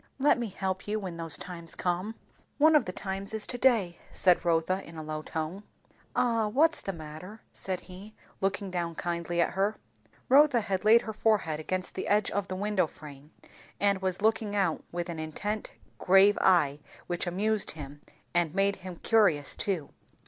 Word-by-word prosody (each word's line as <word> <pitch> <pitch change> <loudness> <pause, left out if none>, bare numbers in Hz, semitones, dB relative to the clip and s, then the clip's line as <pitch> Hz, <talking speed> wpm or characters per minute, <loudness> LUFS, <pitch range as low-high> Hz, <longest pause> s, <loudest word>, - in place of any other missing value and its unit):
"Let 280 -1 +3
me 235 - -2
help 190 0 -4
you 215 +1 -1
when 185 -4 -6
those 165 -2 -1
times 170 -2 -6
come." 185 +5 -2 0.4
"One 310 +2 +5
of 300 - +4
the 180 - -4
times 195 +2 -1
is 215 - -2
to 245 - -5
day," 215 -10 +2
said 180 -3 +3
Rotha 175 +3 +1
in 165 - -12
a 155 - -5
low 155 0 -4
tone. 160 +5 -4 0.5
"Ah? 230 -3 +2
What's 305 +9 +2
the 195 - -3
matter?" 165 +5 -10
said 185 -2 -3
he 195 +4 -12 0.2
looking 195 0 -1
down 170 -2 -2
kindly 170 0 -3
at 170 - +2
her. 200 +3 0 0.5
Rotha 275 -2 +5
had 195 -3 -2
laid 225 +3 +6
her 220 - -5
forehead 205 -8 +1
against 185 +3 -3
the - - -4
edge 210 0 +2
of 205 -1 -2
the 185 - -4
window 200 -2 0
frame, 145 -1 -13 0.5
and 200 -1 +2
was 190 +1 -2
looking 220 -1 +1
out 190 -6 0
with 175 0 -3
an 170 -2 -5
intent 205 +7 -4 0.3
grave 195 +2 +6
eye 150 -6 +4 0.3
which 175 +1 -2
amused 210 +4 +1
him, 145 0 -9 0.3
and 175 -1 +1
made 200 0 +2
him 185 -1 -8
curious 170 -9 +2
too. 180 -8 -1
190 Hz, 180 wpm, -29 LUFS, 170-210 Hz, 0.5 s, laid